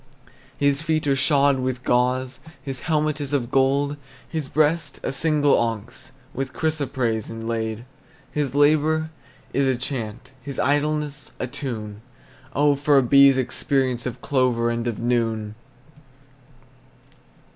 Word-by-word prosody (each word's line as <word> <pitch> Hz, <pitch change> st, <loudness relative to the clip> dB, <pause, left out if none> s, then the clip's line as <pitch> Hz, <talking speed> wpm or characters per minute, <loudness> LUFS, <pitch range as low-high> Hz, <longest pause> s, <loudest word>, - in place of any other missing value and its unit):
His 140 Hz, 0 st, +2 dB
feet 160 Hz, -2 st, 0 dB
are 140 Hz, -1 st, +2 dB
shod 140 Hz, 0 st, +3 dB
with 130 Hz, 0 st, -2 dB
gauze, 125 Hz, +1 st, +1 dB, 0.2 s
His 135 Hz, -3 st, -5 dB
helmet 155 Hz, -1 st, 0 dB
is 145 Hz, 0 st, -4 dB
of 125 Hz, -4 st, -1 dB
gold; 140 Hz, +2 st, +2 dB, 0.3 s
His 155 Hz, -5 st, -4 dB
breast, 155 Hz, -1 st, +1 dB
a -, -, -1 dB
single 145 Hz, 0 st, +3 dB
onyx 115 Hz, +3 st, -3 dB, 0.2 s
With 135 Hz, -1 st, -4 dB
chrysoprase, 130 Hz, -8 st, -1 dB
inlaid. 115 Hz, 0 st, -4 dB, 0.5 s
His 145 Hz, -3 st, -2 dB
labor 155 Hz, +2 st, +3 dB, 0.4 s
is 135 Hz, 0 st, +2 dB
a 130 Hz, -, +2 dB
chant, 120 Hz, -3 st, -5 dB
His 140 Hz, 0 st, -7 dB
idleness 150 Hz, +1 st, -1 dB
a -, -, -1 dB
tune; 120 Hz, -6 st, -6 dB, 0.5 s
Oh, 145 Hz, +1 st, +4 dB
for 145 Hz, +1 st, +3 dB
a 135 Hz, -, +5 dB
bee's 140 Hz, +1 st, +6 dB
experience 130 Hz, -1 st, 0 dB
Of 125 Hz, -, -6 dB
clovers 125 Hz, -4 st, +1 dB
and 115 Hz, 0 st, -3 dB
of 115 Hz, -, -3 dB
noon! 115 Hz, -3 st, 0 dB
135 Hz, 130 wpm, -23 LUFS, 120-145 Hz, 0.5 s, bee's